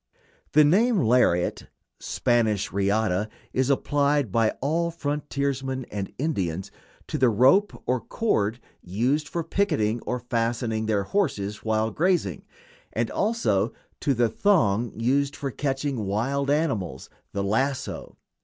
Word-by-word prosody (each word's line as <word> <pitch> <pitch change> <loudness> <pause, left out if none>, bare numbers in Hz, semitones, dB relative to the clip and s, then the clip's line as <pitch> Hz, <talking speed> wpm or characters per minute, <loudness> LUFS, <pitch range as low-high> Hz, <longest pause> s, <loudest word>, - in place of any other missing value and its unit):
The 150 - +7
name 210 +10 +4
"lariat" 110 - +2 0.3
(Spanish, 110 -4 0
riata) 100 0 +1 0.2
is 130 +1 +1
applied 145 -3 +1
by 115 +1 +3
all 165 +5 0
frontiersmen 140 -4 -2
and 100 -2 -4
Indians 95 - -2 0.3
to 150 - -4
the 130 -2 +5
rope 130 - +3
or 125 0 +1
cord 115 - 0 0.2
used 125 - 0
for 170 +2 -3
picketing 150 - 0
or 125 - 0
fastening 115 -2 -1
their 105 -2 +1
horses 105 - -1
while 110 0 0
grazing, 175 - 0 0.5
and - - -1
also 205 - +1 0.3
to 140 -3 +1
the 120 0 +3
thong 115 - +2
used 140 +4 +1
for 140 -3 -4
catching 135 -5 -2
wild 135 +8 -1
animals 115 - -1 0.2
the 100 - -2
lasso. 130 +7 -2
125 Hz, 125 wpm, -25 LUFS, 110-145 Hz, 0.5 s, The